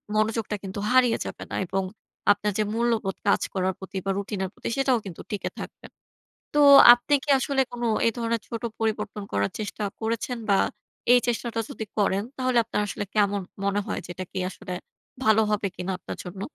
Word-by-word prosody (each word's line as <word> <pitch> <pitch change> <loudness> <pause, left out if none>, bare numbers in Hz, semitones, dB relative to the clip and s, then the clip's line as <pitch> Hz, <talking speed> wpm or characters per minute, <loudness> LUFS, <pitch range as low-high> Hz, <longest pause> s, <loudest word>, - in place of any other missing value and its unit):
মনোযোগটা 215 0 0
কিন্তু 195 +1 -5
হারিয়ে 250 -2 +5
যাবে - - -6
না - - -3
এবং 195 +2 -1 0.5
আপনার 205 +1 +1
যে - - +4
মূল্যবোধ 225 -4 0
কাজ 200 - +4
করার 190 0 0
প্রতি 190 0 -7
বা, - - -1
রুটিনের 200 -1 -3
প্রতি, - - -5
সেটাও 265 -2 +3
কিন্তু 180 -4 -8
টিকে 205 - -2
থাকবে। - - -9 0.7
তো 295 - +4 0.3
আপনি 245 +4 0
কি 295 - -2
আসলে 270 +1 0
কোন 240 0 -6 0.2
এ - - +6
ধরনের 230 -1 0
ছোট 230 -1 -5 0.2
পরিবর্তন 210 -1 -2
করার 100 0 +1
চেষ্টা 210 0 -4 0.2
করেছেন? 230 +2 -2
বা, 195 - +5 0.5
এই 245 - +7
চেষ্টাটা 235 -1 -1
যদি 240 -5 -5
করেন, 200 -1 +2
তাহলে 255 -2 +1
আপনার 225 - -2
আসলে 205 - -4
কেমন 205 -1 +3 0.2
মনে 200 +1 +1
হয় - - -3
যে, - - -10
এটা 185 - -5
কি - - -3
আসলে 185 - -8 0.5
ভালো 220 -1 +5
হবে 210 -1 +1
কিনা 180 +2 -3
আপনার - - -7
জন্য? 185 +1 -8
215 Hz, 185 wpm, -26 LUFS, 195-235 Hz, 0.7 s, এই